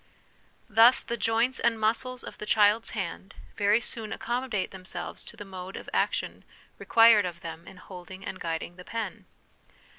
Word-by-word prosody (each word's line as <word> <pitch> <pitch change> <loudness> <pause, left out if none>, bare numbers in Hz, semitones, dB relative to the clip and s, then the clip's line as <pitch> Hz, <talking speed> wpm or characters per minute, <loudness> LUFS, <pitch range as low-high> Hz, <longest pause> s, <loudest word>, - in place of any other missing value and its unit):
Thus, 225 +4 +6
the 235 - -3
joints 235 +3 +1
and 230 -1 +1
muscles 245 +3 0
of - - -10
the 210 - -6
child's 210 +1 +4
hand 190 +1 -5 0.2
very 205 +2 +3
soon 225 -2 -4
accommodate 240 -4 -2
themselves 190 -1 -7
to - - -10
the 205 - -8
mode 190 -1 -8
of - - -9
action - - -1 0.4
required 225 -4 +6
of 170 0 -8
them 165 -1 -8
in 190 - -12
holding 185 +1 -10
and 185 - -6
guiding 165 +1 -4
the 180 - -10
pen. 225 -1 -5
210 Hz, 160 wpm, -28 LUFS, 185-230 Hz, 0.4 s, Thus